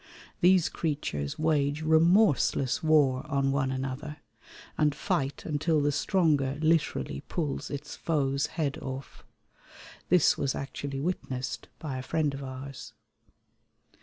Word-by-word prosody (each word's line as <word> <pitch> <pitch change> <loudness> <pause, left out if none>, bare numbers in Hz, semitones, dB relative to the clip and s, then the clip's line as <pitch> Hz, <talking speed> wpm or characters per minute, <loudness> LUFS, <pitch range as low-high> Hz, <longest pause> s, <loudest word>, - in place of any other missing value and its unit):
These 180 -1 +5
creatures 140 - -3
wage 150 -1 +1
remorseless 160 - +3
war 145 -5 +3
on 140 -1 +1
one 135 -1 0
another, 135 +3 -4 0.6
and 150 -2 +2
fight 140 -1 -2
until 155 +1 +1
the 145 0 +2
stronger 145 -3 +1
literally 150 - +1
pulls 150 -6 -2
its 145 +1 -6
foe's 140 -3 0
head 145 -4 -1
off. 135 +1 -7 0.9
This 180 -3 +4
was 135 - 0
actually 140 0 -5
witnessed 135 -6 -3
by 135 -5 -5
a - - -4
friend 150 +1 0
of 140 0 -6
ours. 130 +1 -8
145 Hz, 120 wpm, -28 LUFS, 135-155 Hz, 0.9 s, These